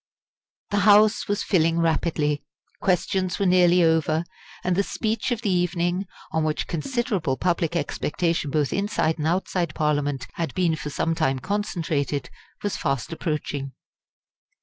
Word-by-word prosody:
The 205 - +2
House 210 +2 +5
was 205 0 0
filling 165 -3 +2
rapidly. 155 -3 +1 0.4
Questions 185 0 0
were 200 - 0
nearly 180 -1 +5
over, 160 0 +2 0.4
and 180 -1 +1
the 200 - +3
speech 220 +4 -2
of 240 -2 -2
the 205 - +1
evening, 180 +1 0 0.2
on 160 0 +1
which 155 -1 -1
considerable 180 - -1
public 170 -2 0
expectation 165 0 -1
both 145 -2 0
inside 195 -5 0
and 150 - 0
outside 175 -2 -1
Parliament 145 -3 0
had 165 -1 -3
been 175 -4 +2
for 150 -1 -5
some 165 +3 0
time 135 -4 +1
concentrated, 160 -6 -2 0.3
was 205 - -1
fast 140 0 -2
approaching. 145 -4 -3
170 Hz, 140 wpm, -24 LUFS, 150-190 Hz, 0.4 s, House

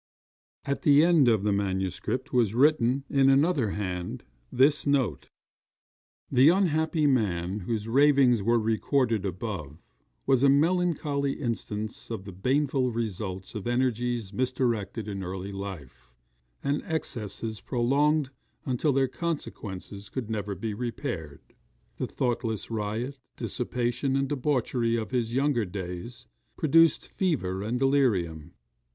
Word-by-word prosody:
At 140 - -2
the 145 +1 +6
end 165 -6 +5
of 110 -4 +3
the 105 - +2
manuscript 95 +6 -2
was 115 -4 +2
written, 135 -1 +3
in 135 -1 +3
another 140 - +3
hand, 90 -3 -4 0.3
this 145 +3 +3
note: 130 - 0 1.0
[The 135 +3 +6
unhappy 160 -4 +2
man 100 -8 +1
whose 105 +2 -3
ravings 135 -2 +4
are 115 +4 +3
recorded 115 0 +1
above, 90 -6 -5 0.5
was 135 -2 +3
a 140 - +5
melancholy 150 -2 +2
instance 110 -3 -4
of 110 -4 -5
the 100 - -7
baneful 130 +6 +1
results 100 -5 -4
of 105 -1 -5
energies 120 -3 0
misdirected 115 -3 -1
in 100 -2 -4
early 95 +2 -5
life, 80 -11 -8 0.5
and 140 +1 0
excesses 110 -7 -4
prolonged 140 +3 +1 0.3
until 135 +3 +1
their 135 0 +3
consequences 105 - -5
could 120 -4 -5
never 105 -2 -3
be 105 +4 -4
repaired. 115 - -5 0.6
The - - -2
thoughtless 115 -4 -2
riot, 115 +5 -3 0.2
dissipation, 120 +3 -1
and 135 0 +1
debauchery 130 -4 0
of 110 0 -3
his 120 -2 -1
younger 135 -3 +2
days 95 +6 -7 0.3
produced 165 +1 +4
fever 95 - -1
and 110 +4 -1
delirium. 110 - +1
120 Hz, 120 wpm, -27 LUFS, 100-140 Hz, 1.0 s, the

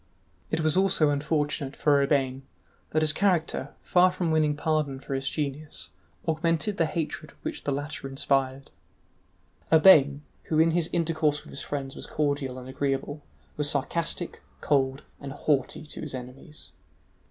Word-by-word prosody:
It 160 - 0
was 155 0 +2
also 185 -6 +3
unfortunate 145 -1 -1
for 145 -2 +3
Urbain 135 -2 +1 0.5
that 155 0 +1
his 155 0 +2
character, 180 -3 0
far 180 0 +4
from 180 -3 -1
winning 155 -2 +2
pardon 150 -3 0
for 135 - -6
his 135 0 -1
genius, 150 0 -5 0.4
augmented 165 +5 0
the 165 - +2
hatred 155 -1 -4
which - - -5
the 145 - 0
latter 145 0 -4
inspired. 135 -1 -1 1.0
Urbain, 150 -4 +7 0.2
who 155 - 0
in 165 +1 +5
his 170 0 +2
intercourse 160 -3 0
with - - -13
his 140 - -5
friends 135 -2 -4
was - - -8
cordial 140 -3 -1
and 125 0 -9
agreeable, 140 +2 -2 0.4
was 150 -1 +1
sarcastic, 165 +5 -2 0.2
cold, 135 -2 +1 0.2
and 140 -1 -7
haughty 145 +1 0
to 150 - -7
his 150 -4 -4
enemies. 130 +5 -9
150 Hz, 150 wpm, -27 LUFS, 140-160 Hz, 1.0 s, Urbain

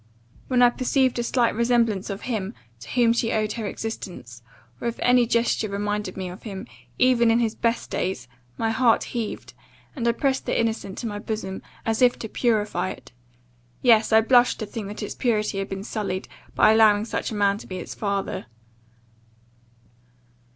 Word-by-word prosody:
when 250 -1 +3
I 245 - +7
perceived 255 0 +1
a - - 0
slight 235 0 +2
resemblance 230 -4 +1
of 195 0 -5
him, 215 -3 -3 0.2
to 120 - -11
whom 235 -2 +3
she 230 -1 0
owed 215 -1 0
her 225 -3 -4
existence; 180 - -6 0.4
or, - - -2
if 235 - -2
any 245 -1 +4
gesture 235 -2 +1
reminded 205 -1 -3
me 190 -1 -3
of 180 +1 -9
him, 195 -4 -7 0.3
even 245 -2 +4
in 225 +1 +4
his 225 -2 +1
best 230 0 -1
days, 180 -10 -2 0.3
my 225 0 0
heart 230 0 +3
heaved, 230 -3 -5 0.4
and 235 -4 -2
I 235 - +4
pressed 265 +2 -1
the - - +1
innocent 225 -4 -2
to - - -5
my 205 -1 -4
bosom, 205 -3 -4 0.2
as 225 +1 0
if 250 -1 +5
to 225 - -5
purify 210 -6 0
it 130 -7 -10 0.7
yes, 225 -3 +5
I 220 0 +7
blushed 245 +2 +4
to - - -1
think 205 0 -6
that 210 +2 -6
its 210 - -4
purity 215 -4 0
had 195 - -4
been 195 0 -5
sullied, 200 -3 -3 0.3
by - - +6
allowing 215 -1 +5
such 225 - -3
a 220 - -5
man 200 0 +2
to - - -11
be 185 - -5
its 180 - -6
father. 200 - -3
220 Hz, 185 wpm, -24 LUFS, 200-235 Hz, 0.7 s, I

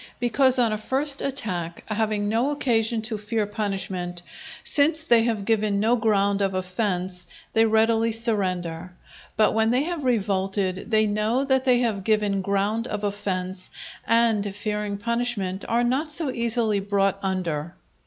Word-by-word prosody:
Because 260 +2 +3
on 235 -3 +2
a 215 - -3
first 275 +5 +1
attack, 180 -11 -3
having 215 -1 -1
no 230 +6 +1
occasion 230 -6 0
to 220 -1 -4
fear 210 +1 -1
punishment, 190 -4 -3 0.4
since 310 +2 +2
they 235 -6 +4
have 220 -4 -1
given 215 -2 +1
no 225 +4 +3
ground 200 -3 +1
of 195 -1 0
offence, 185 -1 -2 0.3
they 225 0 +4
readily 225 +1 +3
surrender; 185 -6 -2 0.4
but 215 - +4
when 220 0 +2
they 250 +4 +2
have 335 -2 -4
revolted, 195 -5 0
they 220 -1 +3
know 215 +5 0
that 265 -1 +1
they 250 -2 +4
have 215 -5 -1
given 210 -2 +1
ground 200 +4 0
of 210 0 -4
offence, 190 -2 -3 0.4
and, 220 -3 +2
fearing 210 -1 -3
punishment, 230 -4 -2
are 235 +1 +2
not 270 +6 0
so 300 -3 -1
easily 235 -3 0
brought 195 0 0
under. 175 -4 -2
215 Hz, 150 wpm, -24 LUFS, 195-235 Hz, 0.4 s, they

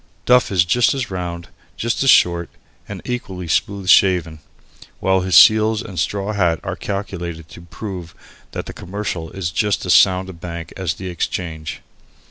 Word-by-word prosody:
Duff 125 -2 +4
is 90 -4 +3
just 120 +9 +2
as 130 -6 -3
round 85 -2 -5
and - - -25 0.2
just 115 0 -1
as 135 - +3
short, 85 -6 +4 0.4
and - - -7
equally 95 -8 -5
smoothly 100 +3 -1
shaven, 90 -5 +4 0.6
while 95 0 +2
his 90 -2 0
seals 110 +3 +6
and 95 -6 -6
straw 100 +3 -1
hat 85 -5 +1
are - - -4
calculated 85 -5 -5
to - - -12
prove 90 -1 -8 0.4
that - - -4
the - - -8
Commercial 90 -3 -5
is 90 -3 -4
just 100 +5 0
as 90 - +3
sound 95 -1 +4
a 95 - -8
bank 85 -1 -8
as 90 -4 -2
the 95 - -7
Exchange. 80 -3 -4
95 Hz, 170 wpm, -19 LUFS, 85-100 Hz, 0.6 s, seals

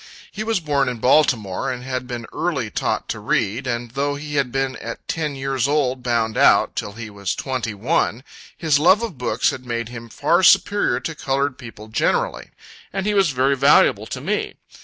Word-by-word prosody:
He 215 - -4
was 225 -2 0
born 145 -5 +1
in 125 - -4
Baltimore, 120 -7 +2
and 125 -1 -6
had 130 -1 -4
been 120 -2 -5
early 140 -11 -2
taught - - -1
to - - -3
read, 115 +7 -1
and 120 -1 -3
though 140 +2 -1
he 150 +1 -7
had 140 -4 0
been 135 0 -1
at 115 0 -8
ten 155 -3 -2
years 135 -1 -1
old 135 -3 0
bound 115 -3 0
out, - - +4
till 100 - -4
he 115 -1 -8
was 100 -2 -3
twenty 125 -5 -3
one, 125 +1 0 0.3
his 155 -4 +2
love 190 +8 +5
of 180 - -5
books 125 -1 +1
had 130 - -8
made 115 -2 -3
him 115 -1 -9
far 170 +10 +2
superior 205 +2 +4
to 165 - -4
colored 140 -2 -1
people 115 -4 -10
generally, 110 - -1 0.4
and 195 -1 -3
he 210 - +1
was 195 -4 +3
very 135 +1 +2
valuable 140 +2 +4
to - - -6
me. - - -2
130 Hz, 195 wpm, -21 LUFS, 115-150 Hz, 0.4 s, love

